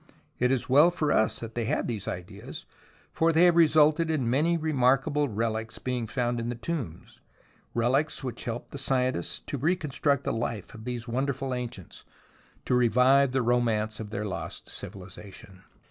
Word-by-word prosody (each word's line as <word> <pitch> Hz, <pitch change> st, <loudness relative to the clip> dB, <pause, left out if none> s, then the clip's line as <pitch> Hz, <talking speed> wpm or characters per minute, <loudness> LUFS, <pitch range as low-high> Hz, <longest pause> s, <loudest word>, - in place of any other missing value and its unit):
It 125 Hz, -, +3 dB
is 130 Hz, -3 st, 0 dB
well 145 Hz, +6 st, +6 dB
for 155 Hz, -4 st, -1 dB
us 110 Hz, -, +2 dB
that 115 Hz, -1 st, -7 dB
they 120 Hz, -1 st, -2 dB
had -, -, 0 dB
these 110 Hz, -5 st, -4 dB
ideas, 95 Hz, +3 st, -7 dB, 0.5 s
for 165 Hz, +1 st, +3 dB
they 165 Hz, +2 st, +4 dB
have 175 Hz, -1 st, +6 dB
resulted 155 Hz, 0 st, +4 dB
in 145 Hz, -7 st, 0 dB
many 155 Hz, +8 st, +2 dB
remarkable 145 Hz, -1 st, +2 dB
relics 110 Hz, +1 st, -2 dB
being 125 Hz, -3 st, -3 dB
found 120 Hz, 0 st, -1 dB
in 115 Hz, 0 st, -3 dB
the 120 Hz, -, -3 dB
tombs, 120 Hz, -, -6 dB, 0.5 s
relics 135 Hz, +6 st, +1 dB
which 125 Hz, -3 st, -5 dB
help 120 Hz, 0 st, -5 dB
the 140 Hz, -, -6 dB
scientists 130 Hz, -8 st, 0 dB
to 145 Hz, -, -5 dB
reconstruct 150 Hz, -3 st, 0 dB
the -, -, -1 dB
life 115 Hz, -3 st, -4 dB
of 110 Hz, 0 st, -11 dB
these 125 Hz, -1 st, -4 dB
wonderful 135 Hz, +2 st, -2 dB
ancients, 120 Hz, -8 st, -6 dB, 0.6 s
to -, -, 0 dB
revive 125 Hz, +3 st, +4 dB
the 130 Hz, -1 st, +1 dB
romance 115 Hz, -3 st, +1 dB
of 110 Hz, -2 st, -6 dB
their 105 Hz, -1 st, -3 dB
lost 100 Hz, -, -6 dB
civilization. 95 Hz, 0 st, -10 dB
125 Hz, 165 wpm, -28 LUFS, 115-145 Hz, 0.6 s, well